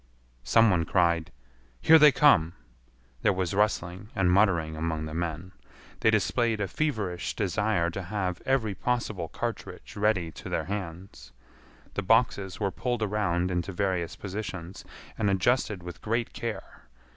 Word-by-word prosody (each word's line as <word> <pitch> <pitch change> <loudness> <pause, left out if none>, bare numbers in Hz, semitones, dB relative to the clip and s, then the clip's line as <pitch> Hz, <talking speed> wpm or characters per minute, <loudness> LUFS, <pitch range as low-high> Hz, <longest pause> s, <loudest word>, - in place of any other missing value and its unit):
Some 115 - +5
one 85 -2 +2
cried, 85 -2 +1 0.5
"Here 160 - +7
they 150 -1 +8
come!" 100 - +4 0.7
There - - +3
was 90 -3 -2
rustling 95 -1 0
and 90 -2 +2
muttering 90 -5 +3
among 80 -1 -2
the 80 - -7
men. 85 +2 -4 0.5
They 110 - +3
displayed 110 +1 +1
a 100 - -1
feverish 105 - -2
desire 100 -3 0
to 95 - -5
have 95 -1 -3
every 125 -6 +1
possible 110 -6 -2
cartridge - - -6
ready 100 -5 +1
to - - -9
their 80 - -1
hands. 95 -1 -7 0.6
The - - -2
boxes 100 -2 +1
were 100 -2 0
pulled 120 0 -2
around 95 -4 0
into 90 +2 -2
various 90 -3 -1
positions, 95 -3 -6 0.4
and 105 -2 +2
adjusted 100 0 +1
with 90 -2 -9
great 115 +2 -1
care. 115 -2 -6
95 Hz, 145 wpm, -27 LUFS, 85-110 Hz, 0.7 s, they